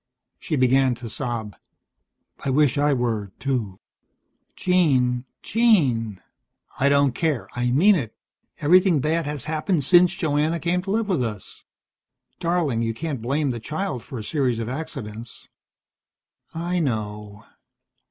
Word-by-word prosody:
She - - -2
began 130 -1 +3
to 120 0 -8
sob. 115 -4 -4 0.9
"I - - -1
wish 140 0 +3
I 145 0 +2
were, 115 -6 -1
too." 120 -8 -2 0.8
"Jean, 130 -9 +2 0.2
Jean 135 - +2 0.3
" - - -26
"I 140 - +4
don't 140 -1 +4
care. 155 -3 -1
I 125 0 -1
mean 170 +12 +5
it. 135 - -2 0.4
Everything 180 +1 +4
bad 160 +3 0
has 145 -3 -3
happened 155 +1 0
since 180 +4 +5
Joanna 160 -2 0
came 175 +2 0
to 190 - -8
live 220 +1 0
with 175 -10 +1
us." 105 -4 -7 0.7
"Darling, 165 -9 0
you 115 -1 -1
can't 145 -2 -4
blame 140 +4 0
the 120 - -4
child 155 - -4
for 130 - -8
a 110 - -5
series 130 -2 0
of 115 -1 -3
accidents." 125 -6 -7 1.0
"I 175 +2 -2
know." 105 -6 -4
140 Hz, 140 wpm, -23 LUFS, 120-165 Hz, 1.0 s, mean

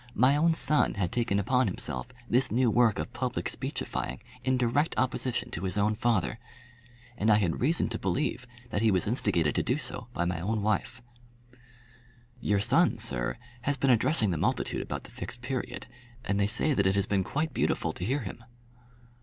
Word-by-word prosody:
My 130 +4 +5
own 165 +2 +3
son 150 -1 +2
had 100 -3 -1
taken 115 -4 +1
upon 125 +6 +2
himself - - -4 0.2
this 125 +3 +3
new 120 +1 +3
work 115 -2 +4
of - - -4
public - - -2
speechifying - - -3 0.2
in 130 0 +2
direct 125 +6 +1
opposition 130 -1 -1
to 85 - -4
his 95 +2 -1
own 105 +1 +2
father! 115 0 0 0.8
And 110 - +2
I 105 - +7
had 95 -6 0
reason 160 +7 +2
to 110 - -4
believe 125 +5 -1 0.2
that 105 - 0
he 110 - +4
was 95 -3 +2
instigated 95 - +1
to - - +1
do - - 0
so - - -4
by 85 - -1
my 85 -1 -1
own 105 +3 -1
wife! 110 +3 -1 1.4
"Your 105 -4 +1
son, 100 - +3
sir, - - -1 0.2
has 145 +2 0
been 135 0 +3
addressing 120 - +2
the 85 - -1
multitude - - 0
about - - -5
the - - -13
Fixed 120 - -7
Period, 130 0 -4 0.4
and 100 0 0
they 100 - +3
say 120 +7 +2
that 100 -6 +2
it 95 - +2
has 100 -1 +2
been 100 -2 +1
quite 150 - -2
beautiful - - 0
to - - -6
hear 135 +9 0
him." 115 - -7
115 Hz, 190 wpm, -29 LUFS, 100-130 Hz, 1.4 s, I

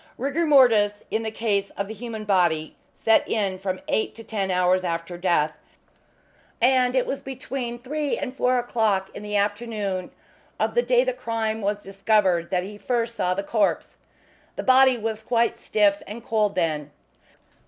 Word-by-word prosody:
Rigor 285 +6 -1
mortis, 225 -8 +4
in 220 - 0
the 220 - -3
case 205 -3 -1
of 200 - -2
the 220 - -6
human 220 -1 -7
body, 175 -6 +1 0.2
set 225 - +2
in 195 -4 -1
from 185 -1 -3
eight 220 - 0
to 225 - -10
ten 205 -3 -3
hours 180 0 +2
after 170 0 -3
death, 170 -4 +1 1.1
and 250 0 +3
it 255 - +2
was 275 - -3
between 255 -2 -5
three 285 +4 -2
and 265 -3 -5
four 255 -1 +2
o'clock 220 -5 0
in - - -8
the 210 0 -4
afternoon 205 -2 -1 0.5
of - - 0
the 485 - +3
day - - +3
the - - -1
crime 225 - -2
was 205 +1 -2
discovered 195 -3 +1
that 180 -2 0
he 205 +2 -9
first 235 -1 -1
saw 180 -3 0
the 200 - -2
corpse. 205 0 0 0.6
The - - -4
body 260 -1 +5
was 220 -1 -3
quite 235 +1 +1
stiff 205 -1 +1
and 225 +3 -8
cold 210 -3 +1
then. 155 -5 -1
215 Hz, 170 wpm, -24 LUFS, 190-240 Hz, 1.1 s, body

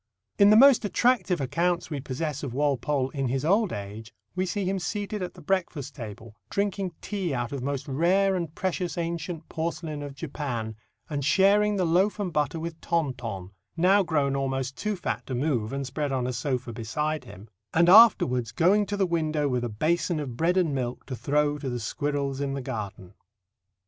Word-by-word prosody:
'" 100 -1 -44
In 200 0 +8
the 215 - +7
most 270 +1 +7
attractive 215 -4 +2
accounts 170 +6 0
we 145 - -2
possess 145 +2 -3
of 130 -4 -5
Walpole 140 -1 0
in 135 -3 -2
his 135 +3 -1
old 200 +3 +3
age, 105 +2 -7 0.2
we 185 +1 0
see 200 +1 -2
him 190 +1 0
seated 205 +4 -3
at 180 - -5
the 175 - -13
breakfast 160 -6 -1
table, 110 -2 -9
drinking 200 -2 -1
tea 190 -8 -2
out 120 -1 -2
of 140 -2 -4
"most 140 +1 -3
rare 185 +8 +2
and 170 -4 -3
precious 180 -3 -2
ancient 170 -1 -4
porcelain 160 -2 -4
of 145 -1 -7
Japan," 135 -7 -4 0.3
and 145 -2 -3
sharing 205 +6 +4
the 185 -2 +1
loaf 185 +6 +2
and 185 -5 -2
butter 150 +1 0
with 165 0 -6
Tonton 120 - -2 0.3
(now 190 +4 +5
grown 145 -6 +1
almost 135 -1 -2
too 210 0 -2
fat 180 - -3
to 130 - -3
move, 125 -5 0
and 140 0 -3
spread 140 +2 -3
on 130 -2 0
a 125 - -2
sofa 125 -1 -2
beside 150 +8 -2
him), 100 +1 -12 0.2
and 170 +1 +4
afterwards 175 - +6
going 200 +5 +3
to 205 +1 -2
the 195 - +3
window 155 -4 0
with 125 -3 0
a 120 - -2
basin 160 - 0
of 135 -5 -5
bread 170 +7 +1
and 170 -6 +2
milk 125 -2 -3
to 130 - -5
throw 145 +3 +1
to 140 - -4
the 120 -1 -3
squirrels 140 +3 -2
in 140 -1 -1
the 135 - -3
garden. 105 -7 -6
150 Hz, 195 wpm, -27 LUFS, 130-180 Hz, 0.3 s, In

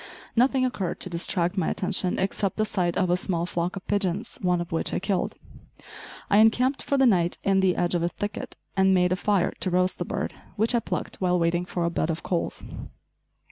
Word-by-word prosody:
Nothing 255 +2 +3
occurred 195 -8 -2
to 185 - -4
distract 175 +2 0
my 180 - +1
attention, 185 -1 0
except 195 0 -1
the 215 - +2
sight 180 -5 -1
of 185 -2 +2
a - - +4
small 175 -2 -1
flock 175 +1 -2
of 190 - -7
pigeons, 200 +3 -1
one 180 -1 +2
of 175 0 -5
which 165 - 0
I - - +1
killed. 195 0 -1 0.9
I 205 - +4
encamped 250 +5 +4
for 280 - 0
the 270 - +5
night 175 -7 +3
in 195 -1 +3
the 190 -2 +3
edge 175 0 0
of 175 - +1
a 170 - +1
thicket, 205 +3 -5 0.2
and 190 -1 +4
made 180 -1 +3
a - - +3
fire 200 0 +1
to 185 - -1
roast 180 +1 +1
the - - -2
bird - - -3 0.2
which 225 +3 +1
I 240 - +4
plucked - - -4
while 180 -1 +2
waiting 175 +1 +1
for 175 -1 -2
a 170 - 0
bed 165 - -1
of 165 0 -3
coals. 175 -2 -2
185 Hz, 220 wpm, -26 LUFS, 175-205 Hz, 0.9 s, the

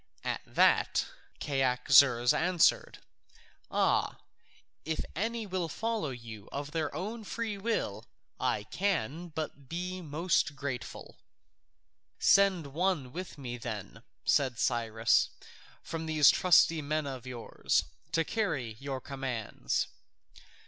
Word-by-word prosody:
At - - -2
that - - +3 0.3
Cyaxares 130 -2 +4
answered, 175 0 +2 0.7
"Ah, - - +1 0.7
if 160 0 -2
any 225 +5 -2
will 185 -4 -2
follow 225 -2 -2
you 115 -5 -9
of 145 +1 -5
their 155 -2 -1
own 215 +7 -4
free 225 0 -3
will, 120 - -2 0.3
I 105 - 0
can 175 - -1
but 150 -4 -6
be 180 +2 -4
most 160 -1 0
grateful." 135 -3 -6 1.0
"Send 195 -5 +4
some 140 - -10
one 165 -6 0
with 180 -1 -6
me 125 -3 -5
then," 110 -4 -6 0.2
said 130 -4 +2
Cyrus, 115 -3 +2 0.5
"from 160 0 -5
these 155 -2 +6
trusty 165 -2 +4
men 150 +1 -1
of 130 -3 -6
yours, 120 -2 0 0.3
to 165 -1 +3
carry 145 - -2
your 135 -1 -4
commands." 130 -6 -2
150 Hz, 115 wpm, -31 LUFS, 125-180 Hz, 1.0 s, these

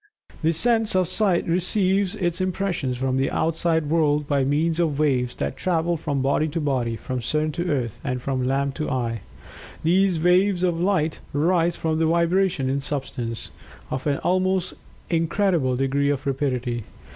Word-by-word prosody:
The 160 0 +2
sense 225 +4 +1
of 185 -2 +3
Sight 195 -3 +1
receives 185 +2 +1
its 175 0 -1
impressions 180 -8 -1
from 130 0 0
the 135 +1 +1
outside 165 0 0
world 150 -2 +2
by 140 -2 +2
means 155 +5 +1
of 160 -5 +1
waves 130 -5 +1
that - - -3
travel 170 -2 0
from 145 -4 -2
body 140 +3 +2
to 160 +2 -3
body 130 -6 -1
from 125 +3 -4
sun 155 +6 0
to 175 +4 -3
earth, 120 -6 -2
and 125 -4 -2
from 130 0 -2
lamp 140 +1 0
to 155 - -2
eye. 120 -5 -2 0.6
These 180 +1 +3
waves 180 +2 +3
of 175 -2 +1
light 175 -5 +1 0.2
arise 170 +2 +2
from 160 -1 -1
vibrations 170 -2 +2
in 140 - 0
substance, 130 -5 -4 0.4
of 130 +3 -3
an 140 -1 +1
almost 185 0 +1 0.4
incredible 165 -5 +1
degree 135 +2 +1
of 145 -1 -1
rapidity. 125 -4 -1
155 Hz, 160 wpm, -23 LUFS, 135-175 Hz, 0.6 s, of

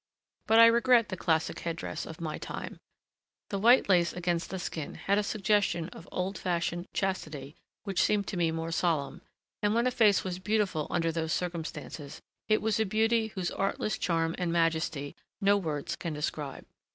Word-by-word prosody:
But 225 - +5
I 230 - +10
regret 235 0 +5
the 190 - -3
classic 160 -3 0
head 170 -1 -3
dress - - -5
of 160 - -9
my 160 -2 -4
time: - - -6 0.7
the 200 - -1
white 240 +5 +6
lace 175 -3 +3
against 175 -1 -1
the 190 - -4
skin 160 -4 -5
had 200 +1 +1
a - - 0
suggestion 195 -4 +1
of 170 - -12
old 185 +2 -2
fashioned 175 0 -1
chastity 155 -7 -3 0.3
which 195 -3 0
seemed 205 -1 +2
to - - -4
me 170 -2 +2
more 165 +1 -3
solemn, 165 -4 0 0.4
and 210 +1 +2
when 235 +1 +2
a 255 - +2
face 215 -5 +4
was 185 -1 -4
beautiful 190 -5 0
under 165 -1 +1
those 160 -1 -2
circumstances, 160 -4 -5 0.3
it 215 -1 +2
was 220 0 +1
a - - +4
beauty 220 +2 +2
whose 190 -4 -3
artless 195 +1 -1
charm 165 -2 0
and 175 -2 0
majesty 160 -4 0 0.2
no 200 0 +4
words 155 -7 -2
can 165 - -4
describe. 150 -1 -4
180 Hz, 180 wpm, -29 LUFS, 165-205 Hz, 0.7 s, I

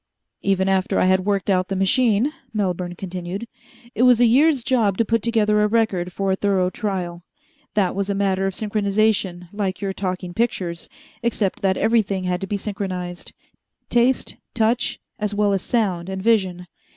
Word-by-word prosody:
"Even 195 -1 +1
after 190 -1 +1
I - - +3
had 185 +1 +2
worked 200 -2 0
out 185 -2 +2
the 195 - -3
machine," 220 +7 +2 0.2
Melbourne 180 -3 -1
continued, 185 +4 -5 0.5
"it - - -2
was 250 -2 +6
a 245 - +6
year's 270 +3 +4
job 225 -7 +1
to 230 - +2
put 230 0 +1
together 210 -2 +2
a 210 - +4
record 205 -5 0
for 195 +2 -1
a - - +2
thorough 190 -2 +1
trial. 180 -6 -3 0.5
That 195 -4 +2
was 200 +1 -2
a 200 - 0
matter 195 -1 +1
of 190 - -4
synchronization 205 -4 0
like 195 -3 -2
your 195 -2 -2
talking 185 -2 -4
pictures, 180 -6 -2 0.3
except 225 -4 -1
that 190 -1 +1
everything 210 -4 +1
had 180 0 -1
to 195 - -3
be 205 - -1
synchronized 190 -4 -5 0.6
taste 240 +2 +2 0.2
touch 230 +1 +1 0.2
as 210 -1 -2
well 205 -1 +2
as 195 - 0
sound 190 -7 -1
and 190 0 -4
vision. 190 -4 +1
195 Hz, 175 wpm, -22 LUFS, 185-220 Hz, 0.6 s, was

